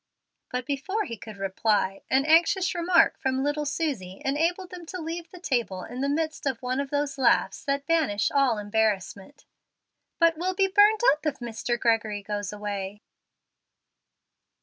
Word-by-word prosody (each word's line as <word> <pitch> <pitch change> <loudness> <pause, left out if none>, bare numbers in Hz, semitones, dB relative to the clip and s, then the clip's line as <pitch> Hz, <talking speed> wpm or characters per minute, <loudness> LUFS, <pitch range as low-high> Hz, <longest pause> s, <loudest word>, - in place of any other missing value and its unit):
Before 300 +10 -2
he 235 - -6
could 215 0 -11
reply, 195 0 0
an 270 +1 +3
anxious 345 +4 +4
remark 350 +1 +3
from 265 0 0
little 290 +1 -1
Susie 255 - -3
enabled 335 +7 0
them 360 -1 -8
to 370 - -6
leave 335 +1 -5
the 360 - -12
table 235 - -1
in 250 +2 -6
the 280 - 0
midst 315 0 -2
of 260 -4 -1
one 255 +1 -1
of 280 -1 -2
those 285 -1 -2
laughs 235 -6 +2
that 280 0 -1
banish 285 -11 +1
all 275 -5 +3
embarrassment. 210 +4 -2 0.7
"But 335 -1 +3
we'll 370 +2 -1
be 390 0 +3
burned 415 +3 +5
up 300 - -9
if 285 -2 -1
Mr. 240 0 -3
Gregory 220 -3 +1
goes 205 -1 -3
away." 205 -1 -5
275 Hz, 155 wpm, -26 LUFS, 210-325 Hz, 0.7 s, burned